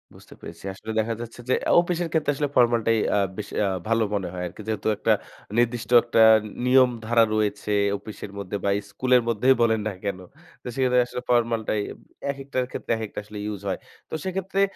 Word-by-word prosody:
বুঝতে - - -15
পেরেছি। - - -10
আসলে 110 +4 -7
দেখা 115 +1 0
যাচ্ছে 120 +1 -9
যে - - +4 0.2
আ - - +3
অফিসের 175 -1 -2
ক্ষেত্রে 155 -3 +1
আসলে 145 0 -1
ফরমাল 120 -2 +4
টাই 115 - +4 0.2
আ - - +3 0.2
বেশ 105 - -5 0.2
আ - - +1 0.2
ভালো 115 0 +2
মনে 95 -3 -1
হয় 90 0 -4
আরকি। 90 - -10
যেহেতু 110 0 -2
একটা - - +3 0.4
নির্দিষ্ট 120 -1 +1
একটা 115 -1 +2 0.4
নিয়ম 130 0 +6 0.2
ধারা 115 0 +4
রয়েছে 105 0 -1 0.3
অফিসের 105 0 -9
মধ্যে 100 0 -5
বা - - +1 0.2
স্কুলের 125 -1 +3
মধ্যেই 120 +4 +3
বলেন 110 -1 +3
না 105 - -2
কেন। 100 -2 -2 0.5
তো - - -8
সেক্ষেত্রে 130 -2 +2
আসলে 125 - -5
ফরমালটাই 115 -3 +1 0.5
একেকটার 135 -2 -3
ক্ষেত্রে - - -5
একেকটা 110 -2 -5
আসলে 105 0 -10
ইউস 105 -2 -4
হয়। 95 - -2 0.3
তো - - -12
সেক্ষেত্রে 195 +1 -1
115 Hz, 185 wpm, -25 LUFS, 105-130 Hz, 0.5 s, নিয়ম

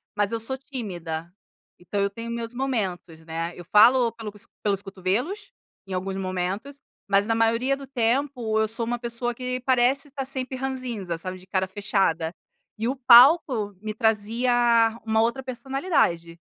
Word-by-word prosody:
mas 205 0 +1
eu 230 - -1
sou 265 +4 -1
tímida. 175 - -6 0.5
Então 190 +3 -3
eu 200 - +1
tenho 230 +3 -7
meus 235 0 -4
momentos, 190 -11 -3
né. 165 +1 -4
Eu 175 - -10
falo 235 +3 +6
pelo 225 -3 -7
s 205 - -9 0.2
pelos 200 -2 +1
cotovelos, 225 - -3 0.4
em 190 - -6
alguns 190 +1 -3
momentos, 190 +9 -4 0.3
mas 200 0 +3
na 225 +1 +1
maioria 230 +4 +2
do 275 - -9
tempo, 245 -2 0
eu 220 - +2
sou 225 +1 0
uma 240 +1 -1
pessoa 240 0 -2
que 255 0 -3
parece 260 +2 +2
estar 275 -1 -5
sempre 260 -1 -3
ranzinza, 250 -10 -4
sabe, 185 +2 -6
de 185 - -16
cara 190 -1 0
fechada. 190 -4 0 0.4
E 225 +2 -1
o 265 - -1
palco 250 - +6
me 215 0 -4
trazia 225 +3 +1 0.5
uma 220 0 +2
outra 235 +4 0
personalidade. 255 - -1
225 Hz, 165 wpm, -25 LUFS, 195-255 Hz, 0.5 s, falo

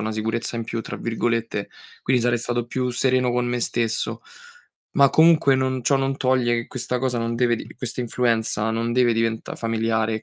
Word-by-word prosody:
"una 110 +1 -2
sicurezza 115 +2 -2
in 115 - -3
più", 115 0 -4
tra - - -6
virgolette, 115 -2 -2 0.3
quindi 125 -1 +2
sarei 120 0 +2
stato 120 0 -2
più 125 +1 -2
sereno 125 0 +1
con 125 0 0
me 120 0 -1
stesso. 115 -1 -1 0.8
Ma 140 -1 +6
comunque 160 -4 +5
non 130 -1 -1
ciò 140 +4 +3
non 135 0 -1
toglie 130 -3 +2
che 115 0 -2
questa 125 0 -3
cosa 125 -1 -1
non 115 0 -2
deve 120 0 +2
d - - -9
questa 125 0 -5
influenza 115 -3 0
non 115 +1 -1
deve 125 -1 +4
diventà 115 0 -1
familiare, 110 -1 -1
120 Hz, 190 wpm, -23 LUFS, 115-125 Hz, 0.8 s, Ma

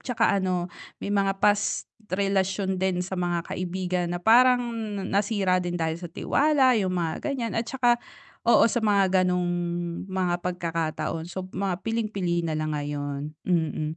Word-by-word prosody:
'tsaka 245 -3 +1
ano 180 -1 -1 0.3
may 200 - -3
mga 195 -1 +1
past 205 0 +2 0.2
relasyon 190 0 0
din 190 -1 +1
sa 190 +1 -5
mga 175 -1 -1
kaibigan 180 0 -2
na 175 - -3
parang 245 +5 +6 0.5
nasira 200 -2 +1
din 175 -1 -3
dahil 160 -1 -1
sa 175 - -6
tiwala, 275 - +3
yung 190 -4 0
mga 170 -3 -2
ganyan. 240 -4 -3
At 225 - 0
saka 245 -2 +3 0.5
oo 235 - +6
sa 240 - 0
mga 195 -3 +3
ganong 180 -1 +1 0.6
mga 185 -2 0
pagkakataon 165 -2 -2
so 185 +1 -6
mga 190 -1 -2
piling-pili 200 -7 -1
nalang 155 -1 -1
ngayon, 145 -1 -3 0.3
mm. 160 -3 0
185 Hz, 145 wpm, -26 LUFS, 175-205 Hz, 0.6 s, parang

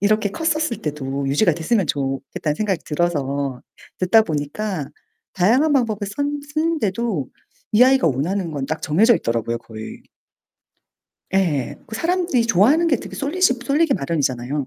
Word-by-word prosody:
이렇게 210 0 +2
컸었을 310 0 -1
때도 140 -2 -3
유지가 170 +6 +3
됐으면 175 +5 0
좋겠다는 140 +1 -2
생각이 195 -4 -1
들어서 140 -5 -1 0.4
듣다 205 +5 +5
보니까 155 0 -3 0.5
다양한 245 - +3
방법을 230 -7 +1
썼 205 +9 -3 0.3
쓰는데도 235 - -1 0.4
이 215 +3 +6
아이가 260 -5 +5
원하는 165 +6 -1
건 140 -2 -3
딱 155 +2 -3
정해져 210 +11 +4
있더라고요, 115 0 -2
거의. 110 -1 -10 1.3
예. 150 -8 0
그 220 - -8
사람들이 335 -4 +1
좋아하는 235 - +4
게 285 - +3
되게 - - -9
쏠리시 300 0 +1
쏠리기 290 +2 +2
마련이잖아요. 140 -4 -2
185 Hz, 345 characters per minute, -21 LUFS, 145-240 Hz, 1.3 s, 이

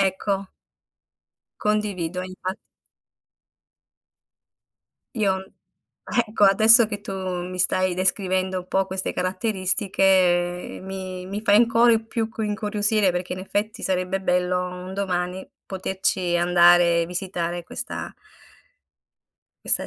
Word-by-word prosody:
Ecco. 195 0 -1 1.1
Condivido, 195 -5 -1
infa 185 0 -5 2.6
Io, 190 -3 0 0.6
ecco 230 -3 -1
adesso 220 +4 +7
che 205 -1 -5
tu 205 - -7
mi 185 -1 -4
stai 185 0 +1
descrivendo 185 0 0
un 180 - -9
po' 190 +1 +1
queste 190 0 -3
caratteristiche 185 -2 +1
mi 185 -1 -6
mi 200 +2 -4
fai 205 -2 +3
ancora 230 +1 +5
più 225 0 -3
cu 225 0 -6
incuriosire 210 -1 +1
perché 180 0 -3
in - - -8
effetti 205 +3 -3
sarebbe 185 0 -1
bello 180 0 0
un 180 +1 -8
domani 185 -1 -3 0.2
poterci 190 -2 -1
andare 175 -1 +5
e - - -3
visitare 175 -1 -3
questa - - -6 1.5
questa - - +5
190 Hz, 105 wpm, -23 LUFS, 180-205 Hz, 2.6 s, adesso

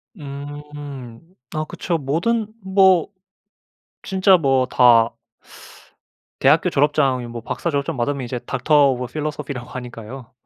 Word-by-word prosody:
음. 145 - -9 0.3
아 155 - -1
그쵸. 170 +2 -3
모든 170 +11 0 0.2
뭐 190 -3 +4 1.0
진짜 190 -1 +4
뭐 135 -4 +2
다 120 -2 +5 1.3
대학교 150 +6 +4
졸업장이 140 -4 +1
뭐 120 0 -7
박사 170 - -3
졸업장 140 -2 -2
받으면 140 +3 -1
이제 125 +1 -4
Doctor 130 +6 -1 0.2
of 125 0 -4
Philosophy 150 -1 -4
라고 125 -1 -8
하니까요. 125 0 -9
140 Hz, 305 characters per minute, -21 LUFS, 125-155 Hz, 1.3 s, 다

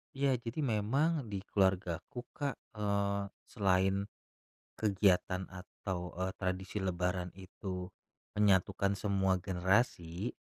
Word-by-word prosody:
Iya, 135 0 +3
jadi 120 +6 -3
memang 135 +6 +1
di 100 -2 -4
keluargaku, 95 - +1
Kak, 140 -2 -2 0.2
eee, 100 -1 +1 0.2
selain 95 -1 +2 0.7
kegiatan 95 -3 +3
atau, 90 -1 -5
eee, 95 +1 -1
tradisi 95 +2 -2
lebaran 90 -1 -1
itu 95 -1 -6 0.5
menyatukan 100 0 +3
semua 95 -2 +1
generasi. 95 0 +1
95 Hz, 100 wpm, -34 LUFS, 95-105 Hz, 0.7 s, Iya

